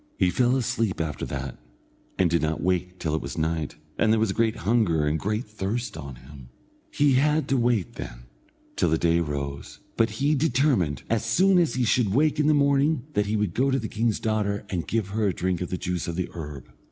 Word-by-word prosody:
He 90 - +3
fell 125 +6 +2
asleep 120 -6 -1
after 80 -3 -3
that, 70 -1 -5 0.6
and 95 - +3
did 85 0 +1
not 80 0 -1
wake 90 0 0
till 80 -4 -2
it 80 - 0
was - - -6
night, 80 -1 -1 0.2
and 110 - +4
there 110 - +3
was 110 -3 +1
great 115 +2 +1
hunger 95 -6 +1
and 75 +1 0
great 105 +4 -2
thirst 105 +2 -3
on 70 -4 -7
him. 65 0 -13 0.4
He 145 -1 +3
had 150 +4 +2
to 135 - +2
wait, 120 -6 +1
then, - - -8 0.5
till - - +2
the 80 - +2
day 85 0 +2
rose; 70 -3 -4 0.2
but 115 0 +3
he 135 +8 0
determined, 130 - +1
as 115 -2 0
soon 180 +12 +4
as 165 -6 +1
he 130 - +1
should 110 -3 +2
wake 150 +2 +2
in 150 - +3
the 155 - +5
morning, 140 0 +2
that 105 0 +1
he 105 - 0
would 105 -5 0
go 135 +3 +2
to 135 - +2
the 110 -4 -3
king's 110 0 0
daughter 105 -2 -1
and 90 -3 -2
give 110 -4 -1
her 105 +1 0
a 95 - +1
drink 90 -1 -1
of 90 - -3
the 90 - -2
juice 90 -1 -3
of 85 - -3
the 90 0 -2
herb. 75 -5 -7
105 Hz, 225 wpm, -25 LUFS, 85-125 Hz, 0.6 s, the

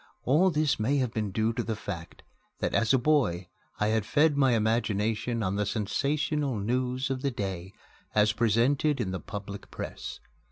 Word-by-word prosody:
All 160 +9 +4
this 150 -6 +1
may 130 +7 +2
have 125 -4 0
been 105 -2 -1
due 110 +4 0
to - - -1
the 110 - -2
fact 95 -6 -7 0.3
that, - - -2
as 110 - +3
a 135 - +5
boy, 120 - +1 0.3
I 105 - +2
had 110 -1 +1
fed 150 +7 +3
my 135 -3 +4
imagination 110 +1 0
on 95 +1 -1
the 105 - +1
sensational 140 +6 -1
news 125 +4 -1
of 130 -1 -2
the 140 - +1
day 95 -6 -4 0.4
as 105 +1 +4
presented 120 +6 +2
in 100 -6 -1
the 95 - -3
public 100 0 -7
press. - - -6
115 Hz, 175 wpm, -28 LUFS, 105-135 Hz, 0.4 s, a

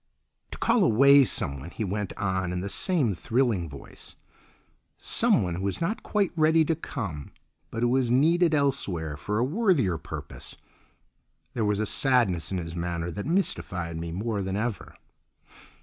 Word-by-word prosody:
"To - - -7
call 225 - +3
away 140 0 +6
someone," 70 - -3
he 110 - -5
went 100 0 -3
on 95 -2 -1
in 90 0 -3
the 100 - -4
same 145 - 0
thrilling 110 -3 0
voice, 70 -1 -12 0.8
"someone 90 -2 +2
who 95 +3 -2
is 95 - -3
not 180 +7 -2
quite 205 -4 0
ready 160 0 +4
to 165 - +1
come, 95 - -6 0.4
but 115 +4 -3
who 120 +1 +2
is 125 -3 +1
needed 160 +6 +3
elsewhere 90 - 0
for 105 +9 -3
a 115 - +2
worthier 140 - +1
purpose." - - -8 1.0
There 115 -3 -1
was 105 -1 +1
a 110 - 0
sadness 115 - +1
in 95 - -1
his 85 -1 -5
manner 85 0 -3
that 100 - -5
mystified 90 - -1
me 85 0 -5
more 105 +4 -2
than 95 0 -3
ever. 110 -2 -4
105 Hz, 160 wpm, -26 LUFS, 90-140 Hz, 1.0 s, away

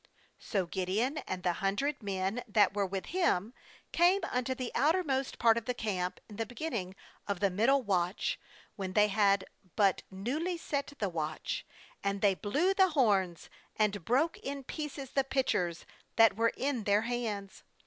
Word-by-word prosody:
19So 195 -5 -1
Gideon, 210 - 0
and 185 -1 -4
the 180 -1 +2
hundred 260 +10 0
men 195 +3 -2
that 205 -2 +4
were 200 -1 0
with 190 0 -4
him, 250 - +1 0.4
came 360 +4 +4
unto 255 +1 0
the 255 -2 -4
outermost 280 -2 +1
part 230 0 +4
of 225 - -17
the 250 - -1
camp 185 -6 -2
in 210 - -11
the 225 - -1
beginning 235 - -4 0.3
of 200 -3 -1
the 200 -1 +2
middle 255 +8 +3
watch, 185 -2 0 0.4
when 190 -3 -4
they 210 0 +5
had 200 -2 +3 0.3
but 200 -3 +3
newly 285 - -2
set 285 -3 -3
the 205 - 0
watch; 155 -2 -3 0.4
and 200 0 -1
they 200 -2 +5
blew 290 - +1
the 380 -1 +5
horns, 200 - +2 0.3
and 205 -3 +1
broke 275 - +1
in 275 0 -5
pieces 285 -2 -6
the 275 - +2
pitchers 185 -11 0 0.3
that 225 -3 +6
were 230 +2 +2
in 260 -5 -1
then* 205 +1 +3
hands. 225 -5 -3
220 Hz, 165 wpm, -31 LUFS, 195-270 Hz, 0.4 s, that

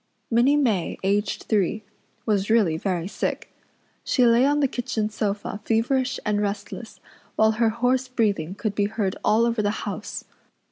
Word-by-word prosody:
Minnie 240 +5 +4
May, 225 - +1
aged 200 +1 0
three, 210 +1 0 0.4
was 205 -2 +1
really 215 -8 +3
very 175 0 -2
sick. - - -4 0.5
She 250 - +3
lay 235 +3 +5
on 290 +1 +2
the 280 - +3
kitchen 220 -4 -2
sofa 205 -1 -3
feverish 250 +4 +1
and 210 0 +1
restless, 205 +2 -5 0.4
while 220 0 +4
her 225 +1 +2
hoarse 250 +3 +1
breathing 200 -8 0
could 215 -1 -2
be 205 0 +1
heard 205 -2 -2
all 225 +2 +4
over 230 -2 0
the 205 - +1 0.2
house. - - -5
220 Hz, 155 wpm, -24 LUFS, 205-235 Hz, 0.5 s, lay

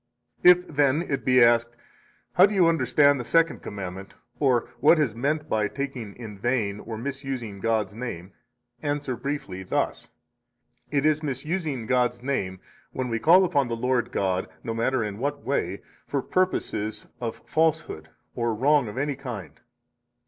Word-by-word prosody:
51 180 0 +6
If, - - -12
then, 145 +1 +3
it 140 -5 -3
be 125 -1 +5
asked: 120 0 +3 0.6
How 185 +2 +7
do 205 - -4
you 185 -3 +5
understand 145 -2 +3
the - - -3
Second 165 +7 +2
Commandment, 95 -1 -7 0.2
or 130 -5 +2
what 155 +5 +6
is 145 -8 +1
meant 150 +6 -1
by 110 -5 +1
taking 130 -6 -5
in 110 -4 -9
vain, 110 -3 0
or 110 0 -6
misusing 130 -5 -5
God's 110 -2 0
name? 100 -6 -6 0.5
answer 145 -3 -2
briefly 125 -8 -4
thus: 95 - -2 0.8
It 145 0 0
is 155 0 +3
misusing 150 -2 -3
God's 125 0 +1
name 95 -9 -2 0.3
when 130 -1 -3
we 115 -1 -1
call 180 +8 +6
upon 145 -7 +1
the 115 - -2
Lord 125 0 0
God, 95 -1 0 0.2
no 115 - -3
matter 115 +2 0
in 105 -1 -5
what 140 +2 -2
way, 100 -8 -2 0.2
for 140 -2 -1
purposes 110 - -1
of 115 -3 -5
falsehood 155 - 0 0.2
or 115 -2 -1
wrong 140 +2 +3
of 105 - -7
any 145 +1 -1
kind. 120 - -8
125 Hz, 160 wpm, -25 LUFS, 110-145 Hz, 0.8 s, How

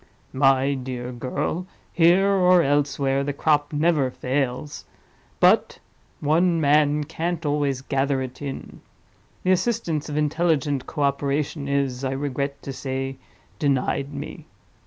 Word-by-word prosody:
"My 135 0 +3
dear 125 -2 -5
girl, 140 +8 -3 0.3
here 175 +3 +5
or 180 -3 +4
elsewhere, 140 -1 +1
the 145 +1 -2
crop 145 0 +1
never 150 -3 +2
fails—but 130 +2 -1 0.4
one 165 +3 +2
man 150 0 +3
can't 165 +2 -3
always 145 -3 0
gather 135 0 0
it 130 +1 -6
in. 140 -2 -7 0.6
The 185 - +2
assistance 185 -6 0
of 150 - -3
intelligent 150 -3 0
co 150 - -2
operation 140 +1 -1
is, 140 -2 -1
I 130 0 -1
regret 140 0 -3
to 135 - -5
say, 135 0 -4 0.4
denied 140 0 0
me. - - -8
145 Hz, 120 wpm, -24 LUFS, 135-155 Hz, 0.6 s, here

